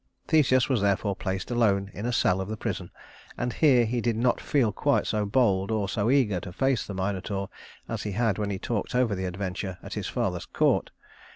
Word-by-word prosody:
Theseus 130 -5 +4
was 130 -6 +1
therefore 100 0 +1
placed 95 +5 -4
alone 100 -5 +2
in 105 +4 -4
a - - 0
cell 95 -5 +2
of 95 - -4
the 110 - -4
prison, - - -4 0.5
and 120 0 -2
here 130 -6 +4
he 120 +2 -1
did 115 -1 0
not 120 +2 +1
feel 130 -7 +2
quite - - +1
so 105 -1 -1
bold 100 -4 +2
or 110 -3 0
so 100 +3 0
eager 125 -9 +3
to 90 - -8
face 135 +5 0
the 100 - -5
Minotaur 95 +1 -2 0.4
as - - -3
he 105 - -4
had 115 0 +1
when 105 -1 -1
he 100 - -2
talked 115 +3 -3
over 125 -4 +2
the 95 -1 -3
adventure 95 0 -4
at - - -7
his - - -3
father's - - -2
court. - - +1
105 Hz, 210 wpm, -27 LUFS, 95-120 Hz, 0.5 s, Theseus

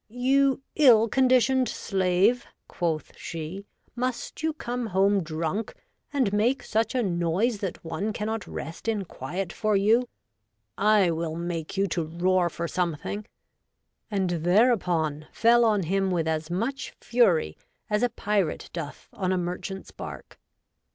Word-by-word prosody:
You 270 +3 +2
ill 235 -7 +6
condi 255 +2 +4
tioned 255 +2 +2
slave,'' 190 +5 +1 0.2
quoth 165 -3 -3
she, 165 +5 -6
" - - -39
must 255 +3 -4
you 320 0 +1
come 245 -5 -4
home 195 0 +3
drunk 165 +6 -3 0.4
and 255 -8 +1
make 240 +5 +2
such 225 +4 0
a 250 - +2
noise 185 +5 0
that 190 -4 -5
one 165 +7 -2
cannot 215 -2 -3
rest 165 +8 -7
in 210 -4 0
quiet 175 +5 -5
for 215 -2 +1
you? 225 +5 +3 0.7
I 205 -3 +4
will 160 -1 -2
make 170 +1 -4
you 195 - +3
to 170 0 -1
roar 175 +2 +1
for 170 +1 -4
some 175 -2 -1
thing," 205 +8 -6 0.8
and 195 -4 0
thereupon 175 - +2
fell 235 +1 +4
on 210 -4 +3
him 195 +3 0
with 170 -3 0
as 160 0 -1
much 230 +11 -3
Fury 235 -10 +2 0.3
as 210 -1 0
a 245 - +3
Pyrat 205 -6 -1
doth 165 -4 -6
on 185 -2 -1
a 185 - +1
Merchant's 180 +2 -4
bark. - - -9
195 Hz, 150 wpm, -26 LUFS, 170-230 Hz, 0.8 s, ill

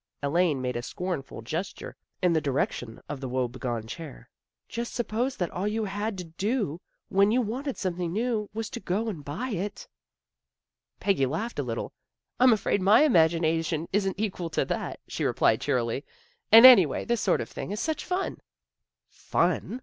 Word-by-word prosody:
Elaine 150 -2 +1
made 125 -1 -2
a 120 - -2
scornful 155 -4 -5
gesture, 165 - -5 0.3
in 180 -2 +4
the 160 - +2
direc 140 -2 0
tion 115 -2 -8
of 145 -2 -6
the 130 - -4
woe 130 0 0
begone 120 -2 -4
chair. 140 +4 -9 0.2
" - - -62
Just 235 0 -5
suppose 240 +3 -1
that 175 - -2
all 185 +3 -2
you 215 +1 -1
had 205 +1 -3
to 180 - -4
do 180 - -2 0.3
when 200 +1 +4
you 240 +4 +3
wanted 255 +4 -3
some 185 -3 -2
thing 175 -2 -2
new 220 -1 -1
was 220 +1 -4
to - - -5
go 205 +5 -1
and 165 -9 -6
buy 165 - -4
it." 200 -1 -4 1.1
Peggy 155 -10 +2
laughed 210 - -3
a 130 -4 -2
little. 115 - -4 0.5
"I'm 255 0 +7
afraid 205 -2 +1
my 205 +9 +6
im 300 - +3
A - - +1
BUSY 160 -2 +7
AFTERNOON 165 0 +1
57 160 -1 -2
agination - - -17
isn't 195 -1 0
equal 185 -5 -2
to - - 0
that," - - -3
she - - -4
replied - - +2
cheerily. - - -1 0.2
" 485 0 -40
And, 225 +3 +10
anyway, 190 - +7
this 235 -3 0
sort - - +2
of - - -4
thing - - -6
is 205 +1 -3
such 315 +3 -2
fun! 365 +2 -2 0.2
" - - -61 0.2
" - - -63
Fun! 245 - -1
190 Hz, 205 wpm, -27 LUFS, 155-225 Hz, 1.1 s, And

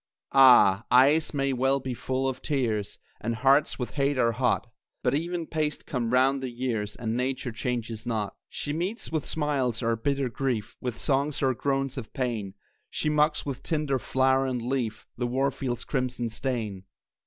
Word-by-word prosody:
Ah! 120 -7 +7
eyes 140 +5 +5
may 140 -2 0
well 135 +2 +2
be 130 -1 -4
full 130 +2 -1
of 130 -1 -3
tears, 115 -8 -1 0.2
And 115 +2 -2
hearts 140 +5 +3
with 125 - -4
hate 140 -1 0
are 115 -2 +3
hot; 115 - +1 0.4
But 125 - +2
even 170 +3 -1
paced 155 -2 -2
come 120 -4 -2
round 135 +2 +3
the 130 - -3
years, 120 -4 -3
And 115 -2 -3
Nature 130 0 -1
changes 115 -1 -3
not. 110 -5 -2 0.2
She 145 - -4
meets 185 +7 -3
with 155 -2 -2
smiles 135 -6 -1
our 115 0 +2
bitter 140 +3 0
grief, 120 -4 -2
With 125 -3 -3
songs 140 +1 0
our 130 -1 +3
groans 135 +1 -1
of 110 - -10
pain; 110 -7 -2 0.3
She 150 - -1
mocks 150 0 +2
with 135 -2 -4
tint 150 -2 -2
of 130 -2 +1
flower 130 0 +2
and 125 -2 -1
leaf 120 -3 -2
The 120 0 -1
war 135 +3 +1
field's 125 -3 -4
crimson 125 -3 -1
stain. 110 -5 -3
130 Hz, 175 wpm, -27 LUFS, 120-140 Hz, 0.4 s, Ah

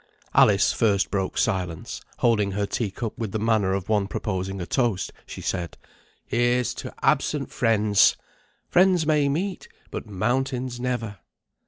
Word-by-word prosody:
Alice 100 -1 +5
first 100 -4 +1
broke 95 -1 -2
silence; 90 -6 -2 0.2
holding 105 -4 +2
her 100 +1 0
tea 105 +1 -2
cup 110 +3 -5
with 110 -4 -3
the - - 0
manner 110 -3 +2
of 95 -1 -3
one 105 -2 +1
proposing 95 -1 -3
a 90 - -3
toast, 120 -6 0
she - - -8
said, 90 -3 -3 0.5
"Here's 120 +1 +1
to - - -7
absent - - +1
friends. 105 -2 +3 0.5
Friends 180 -2 +4
may 150 -2 +3
meet, 180 +7 -2 0.2
but - - -5
mountains 125 +4 -1
never." 120 -6 -3
110 Hz, 145 wpm, -25 LUFS, 100-125 Hz, 0.5 s, Alice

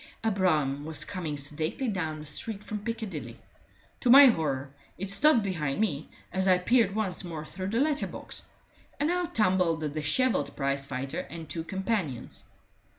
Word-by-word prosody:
A 225 - +2
brougham 150 -8 +1
was 160 0 -2
coming 165 -6 -4
sedately 155 - -3
down 170 -7 -2
the 150 - -9
street 200 +8 -3
from 210 0 -4
Piccadilly; 225 -1 -5 0.6
to 250 - 0
my 280 +3 +11
horror, 145 - +1 0.3
it 195 +1 -3
stopped 240 +3 +4
behind 155 -7 -2
me 155 -9 -1 0.2
as 190 +1 +1
I 185 -1 +6
peered 205 +1 +3
once 195 -4 -1
more 160 -3 -6
through 185 +4 -5
the 225 +3 0
letter 295 +1 +1
box, - - -8 0.6
and 300 +3 +2
out 355 -1 -2
tumbled 185 -6 +2
the 155 - -1
dishevelled 155 - 0
prizefighter 140 -1 -2
and 165 +1 -7
two 165 +2 -4
companions. 190 - -3
185 Hz, 160 wpm, -28 LUFS, 150-220 Hz, 0.6 s, my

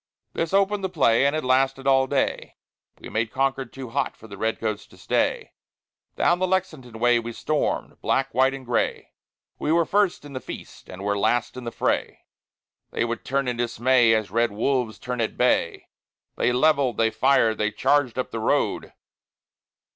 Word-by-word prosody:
This 165 -1 -2
opened 200 +1 +2
the 190 - -1
play, 135 -6 +3
and 140 - 0
it 155 - -2
lasted 135 +1 +1
all 135 -1 +4
day. 140 0 -1 0.4
We - - -9
made 110 0 -1
Concord 135 -2 -1
too 130 -2 -8
hot 140 +3 -2
for 110 - -14
the 100 - -9
Red 110 +3 -2
Coats 110 -2 -3
to - - -19
stay; - - -1 0.6
Down 175 +1 +2
the 185 - +1
Lexington 155 -11 -2
way 120 +1 +3
we 115 0 -5
stormed, 155 +5 -2
black, 135 0 0
white, 130 +2 +3
and 135 -1 -10
gray; 120 0 -1 0.5
We 150 - -1
were 170 0 +3
first 200 -5 +1
in 145 - -10
the 130 - -4
feast, - - -10
and 95 +1 -8
were 100 0 0
last 120 +3 0
in 125 -1 -8
the 115 - -4
fray. - - -1 0.7
They - - -1
would 115 -1 -4
turn 135 0 -1
in 125 -1 -2
dismay, 120 0 +3
as 110 -4 -2
red 115 +1 +1
wolves 115 +1 -1
turn 125 -1 -4
at 110 - -2
bay. 125 -8 +1 0.5
They - - +1
levelled, 135 -1 +2
they 110 -1 +2
fired, 115 -2 +2
they 105 - +1
charged 130 +4 +1
up 130 - -3
the 115 - -4
road. 110 - 0
125 Hz, 185 wpm, -24 LUFS, 115-140 Hz, 0.7 s, all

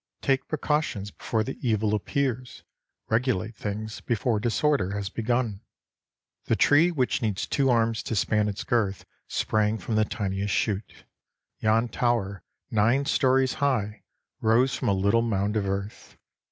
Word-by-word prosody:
Take 135 -1 +1
pre 155 - -2
cautions 145 -10 -1
before 110 -2 -1
the 135 - -6
evil 110 -4 +1
appears; 125 +2 -2 0.4
regulate 110 -2 0
things 110 +1 -5
before 115 -1 0
disorder 115 -3 +1
has 100 -2 -3
begun. 115 -3 -1 0.8
The - - +2
tree 155 +4 +5
which 135 -8 0
needs 105 -4 -1
two 135 -2 +1
arms 115 -2 +2
to 115 - -2
span 105 +1 +1
its 105 0 -3
girth 105 -5 0 0.2
sprang 110 0 0
from 110 +3 -5
the 110 0 +3
tiniest 100 -2 -2
shoot. 105 -1 -2 0.6
Yon 110 +2 +2
tower, 110 -5 -1 0.3
nine 115 +6 +3
storeys 130 -1 +2
high, 110 -7 0 0.4
rose 120 +4 +3
from 125 - -2
a - - +3
little 100 +4 +2
mound 105 -2 0
of 100 -2 0
earth. 100 +2 -5
110 Hz, 145 wpm, -26 LUFS, 105-125 Hz, 0.8 s, tree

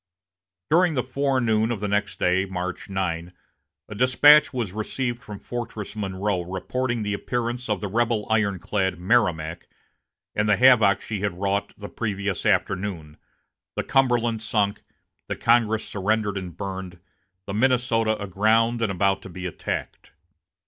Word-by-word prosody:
During 170 0 +4
the 125 - +1
forenoon 125 -5 +1
of 115 - -2
the 105 - -2
next 100 -2 -1
day, 90 +2 +2
March 95 0 -5
9, 90 -2 -3 0.5
a - - -8
despatch 135 +6 +6
was 120 -8 -3
received 120 +3 -3
from 105 -4 -8
Fortress 115 -2 -6
Monroe, 100 -2 -2
reporting 115 +7 -2
the 105 0 -1
appearance 120 +3 -3
of 105 -4 0
the 105 - -2
rebel 110 +1 0
ironclad 100 -3 0
Merrimac, 85 -5 0 0.7
and 105 0 0
the 105 - +4
havoc 120 -6 +5
she 105 -3 -4
had 95 -3 -3
wrought 100 +1 -1
the 100 - -7
previous 100 -4 -3
afternoon 90 -6 -1 0.6
the - - -1
Cumberland 120 -4 +2
sunk, 105 -2 0 0.5
the - - -3
Congress 115 -2 +2
surrendered 105 +1 -1
and 90 -3 -6
burned, 95 -3 -6 0.5
the 100 - -5
Minnesota 115 -2 +2
aground 110 +4 +2
and 110 -3 +1
about 95 +1 +1
to 95 - -10
be 90 +1 -7
attacked. 90 - -5
105 Hz, 140 wpm, -24 LUFS, 95-120 Hz, 0.7 s, despatch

